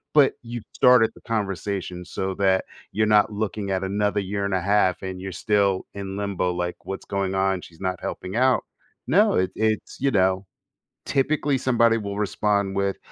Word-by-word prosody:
But 145 -3 +6
you 120 0 -6
started 125 -3 +5
the - - -17
conversation 95 -4 -3
so 95 +2 -3
that 95 -1 +3 0.3
you're 110 +1 +1
not 105 +1 +3
looking 105 -1 -3
at 95 0 -1
another 105 +2 0
year 100 +1 -2
and 100 - -2
a 95 - 0
half, 95 -1 +2
and 95 -1 -5
you're 95 0 -5
still 100 +1 +1
in 100 -1 -6
limbo, 100 -3 -1
like, 90 0 -4
what's 95 - -6
going 95 -1 -2
on? 95 -1 +1
She's 85 -1 -14
not 95 -1 -2
helping 95 +2 -5
out. 130 +1 +3 0.4
No 205 - +4
it 95 0 +1
it's 110 -1 -1
you 140 +1 +1
know, 95 -2 +2 0.6
typically, 145 0 +1
somebody 115 -3 +3
will 100 -1 -5
respond 100 -1 0
with, 100 0 0
100 Hz, 180 wpm, -24 LUFS, 95-110 Hz, 0.6 s, But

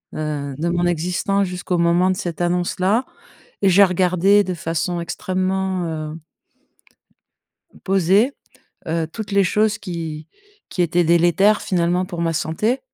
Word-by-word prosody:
heu, 145 -3 -4
de 160 +3 -2
mon 175 0 0
existence 180 +4 0
jusqu'au 180 0 -3
moment 170 +2 +3
de - - -1
cette 175 -1 -4
annonce-là 180 +6 0 0.6
et 195 - +4
j'ai 195 +2 +6
regardé 185 +2 +3
de 185 -1 -3
façon 170 +1 -2
extrêmement, 185 +1 -2 0.3
heu 160 - -9 1.7
posé, 195 +7 +3 0.5
heu, 160 0 -1
toutes 215 -2 -6
les 200 0 +4
choses 210 +3 +1
qui 165 -6 -6 0.4
qui 180 - 0
étaient 175 +1 +2
délétères, 175 +5 +3
finalement, 180 0 0
pour 175 -2 -6
ma 165 -1 0
santé. 215 - -1
180 Hz, 135 wpm, -20 LUFS, 170-195 Hz, 1.7 s, j'ai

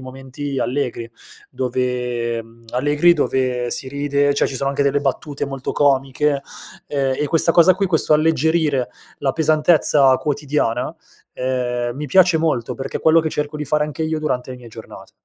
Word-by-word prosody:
momenti 135 +1 -6
allegri 125 -3 -3 0.4
dove, 125 -2 -2
mhmm, 115 +1 -20
allegri, 145 +7 +3
dove 125 -5 -1
si 130 - -4
ride 140 0 0
cioè - - +2
ci 135 - -6
sono 135 +1 -1
anche 140 +1 0
delle 140 0 +1
battute 140 +1 -3
molto 135 -1 -5
comiche, 140 0 +1 0.5
ehm, 135 -2 0
e 150 - 0
questa 165 +3 +2
cosa 175 +2 +6
qui, 195 +2 -1
questo 160 -3 +2
alleggerire 155 -3 +2 0.3
la 135 -2 0
pesantezza 155 -3 +4
quotidiana, 145 -5 -2 0.4
ehm, 125 -1 -2
mi 150 - -5
piace 180 +3 +4
molto, 130 -7 -1
perché 135 +3 -5
è - - -15
quello 160 +1 +5
che 155 -1 -3
cerco 150 +1 -3
di 150 - -4
fare 150 +1 +1
anche 150 +2 -5
io 160 0 -1
durante 130 -4 -3
le 125 - -8
mie 120 -2 -13
giornate. 115 0 -12
140 Hz, 170 wpm, -20 LUFS, 125-150 Hz, 0.5 s, cosa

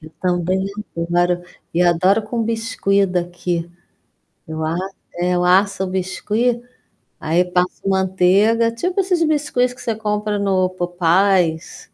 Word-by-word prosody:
Eu 155 0 -12
também 185 +1 0 0.3
adoro, 175 +1 +1 0.3
e 175 - +3
adoro 185 +5 +3
com 230 +2 -3
biscuit 220 -3 0
daqui. 175 -1 -3 0.8
Eu 160 0 -4
a 160 +2 -1 0.4
é, 175 +1 0
eu 175 - +1
asso 190 +1 +3
o - - -2
biscuit, 210 +6 -1 0.6
aí 165 +3 +2
passo 180 +1 -1
manteiga, 190 +4 +3
tipo 355 +12 -2
esses 360 -3 +1
biscuits 285 -5 +1
que - - -14
você 225 -2 -2
compra 210 -1 -2
no 190 -2 +1
Popeyes. 175 -1 +1
190 Hz, 130 wpm, -19 LUFS, 175-215 Hz, 0.8 s, e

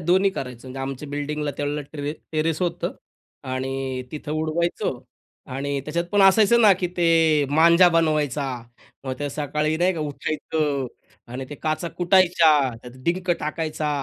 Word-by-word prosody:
दोन्ही 185 +4 +3
करायचं 125 -6 -7
म्हणजे 130 +1 -7
आमच्या 135 +2 -5
बिल्डिंगला 145 +1 -3
त्यावेळेला 145 +1 -2
ट्रे 145 -1 -3 0.2
टेरेस 155 +1 0
होतं 175 - -2 0.6
आणि 130 0 -3
तिथं 150 -1 -6
उडवायचो 160 +2 -1 0.6
आणि 140 +2 -2
त्याच्यात 170 +3 -2
पण 205 -1 +4
असायचं 210 +4 +6
ना 215 -3 +7
की 180 - +1
ते 165 -3 +4
मांजा 170 +4 +6
बनवायचा, 155 -4 +1 0.6
मग 130 - -3
ते 145 - -2
सकाळी 150 +2 -1
नाही 180 +3 +2
का 165 - -4
उठायचं 150 -1 -2 0.5
आणि 130 +1 -5
ते - - -5
काचा 155 +3 -2
कुटायच्या, 175 -3 +4 0.2
त्यात 125 - -10
डिंक 180 +1 0
टाकायचा 155 -1 -2
155 Hz, 145 wpm, -23 LUFS, 145-170 Hz, 0.6 s, ना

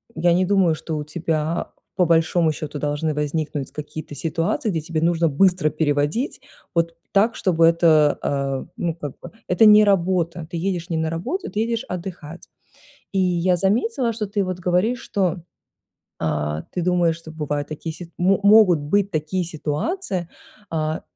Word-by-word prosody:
я 170 +2 +3
не 185 +1 +2
думаю, 185 -4 +3
что 155 0 -5
у 150 - -3
тебя 155 +1 -2 0.2
по 180 -2 +3
большому 165 0 +3
счёту 150 -1 -6
должны 150 +1 -1
возникнуть 150 -1 -2
какие-то 150 0 -7
ситуации, 165 - -1
где 165 -4 -1
тебе 160 0 -3
нужно 170 0 +2
быстро 180 +1 +3
переводить, 150 - 0 0.4
вот 165 0 +1 0.2
так, 215 +4 +3
чтобы 165 -4 +2
это, 165 -3 +4
э. 135 -1 -2
Ну 170 -2 -1
как 145 -5 -6
бы, 175 - -10 0.2
это 180 +5 +4
не 210 0 +8
работа, 175 -4 +1
ты 170 - -3
едешь 175 -1 -2
не 165 - -1
на 160 0 0
работу, 185 - -3
ты 210 - -3
едешь 230 0 -1
отдыхать. 170 -3 -7 0.7
И 195 - 0
я 180 0 +2
заметила, 230 +5 +1
что 215 -1 -3
ты 205 0 -1
вот 185 -1 -4
говоришь, 180 +7 +1
что, 185 -3 -1 0.8
а, 75 -1 -1
ты 180 - -1
думаешь, 175 -2 +2
что 165 -1 -11
бывают 150 -2 -3
такие 155 +2 -6
си 170 0 -10
мо 190 +2 +3
могут 205 -5 +6
быть 195 +7 +1
такие 160 +2 -1
ситуации, 170 - -3 0.4
а, 155 -1 -2
170 Hz, 165 wpm, -22 LUFS, 155-185 Hz, 0.8 s, не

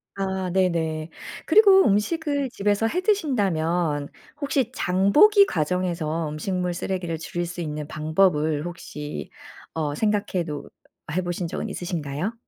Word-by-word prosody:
아. 190 -1 -2
네네. 165 -4 0 0.4
그리고 395 -3 +7
음식을 285 +6 +1
집에서 205 0 +1
해 360 +9 -1
드신다면 180 - 0 0.3
혹시 270 -4 0
장보기 275 - +5
과정에서 165 - -1
음식물 180 +3 -2
쓰레기를 175 -2 -3
줄일 175 +1 -3
수 175 0 -6
있는 150 -2 -4
방법을 155 -1 +1
혹시 150 -4 -7 0.4
어 150 -3 -2
생각해 205 -2 0
놓 150 -3 -5 0.5
해 185 - +1
보신 175 -1 -3
적은 - - -4
있으신가요? 170 +2 -3
180 Hz, 280 characters per minute, -24 LUFS, 160-205 Hz, 0.5 s, 그리고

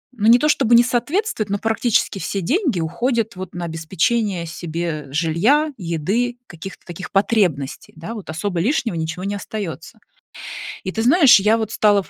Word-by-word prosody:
ну 215 -1 0
не 240 +2 +7
то 300 - +2
чтобы 240 -5 +3
не 235 - +7
соответствует, 245 - -1
но 200 0 -1
практически 225 -2 +1
все 195 +1 -3
деньги 270 - 0
уходят 225 +7 -1
вот 185 -1 -7
на 175 -1 -4
обеспечение 170 +4 -1
себе 160 -2 -4
жилья, 180 - +2
еды, 200 +8 -1
каких-то 175 +3 -10
таких 175 +1 -8
потребностей, 190 -9 0
да. 190 +9 -7
Вот 200 -6 -9
особо 175 +1 -2
лишнего 230 - 0
ничего 160 +3 -4
не 200 +1 -2
остается. 200 0 -6 0.8
И 190 - -3
ты 220 - -2
знаешь, 270 - +7
я 210 +3 +3
вот 220 -1 -3
стала 205 -2 +3
в - - -19
200 Hz, 170 wpm, -20 LUFS, 170-235 Hz, 0.8 s, не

